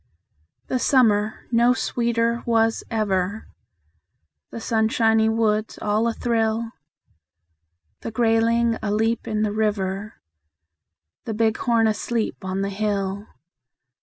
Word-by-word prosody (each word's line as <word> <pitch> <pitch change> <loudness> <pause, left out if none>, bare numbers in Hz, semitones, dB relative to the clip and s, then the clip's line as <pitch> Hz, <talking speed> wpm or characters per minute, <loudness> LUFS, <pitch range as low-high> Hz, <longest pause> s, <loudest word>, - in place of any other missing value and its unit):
The 255 - -1
summer 215 -6 +2
no 240 +1 +4
sweeter 235 -1 0
was 225 -1 +2
ever; 205 -2 -1 1.0
The - - -7
sunshiny 225 0 +2
woods 220 -1 0
all 215 +2 +1
athrill; 225 -1 -1 1.3
The - - -5
grayling 230 0 +2
aleap 220 +2 0
in 215 -1 -1
the 210 - 0
river, 210 -1 -2 1.1
The 220 - -3
bighorn 225 +1 +2
asleep 220 +1 -2
on 190 +1 -2
the 200 - -2
hill. 200 0 -2
220 Hz, 100 wpm, -23 LUFS, 210-230 Hz, 1.3 s, no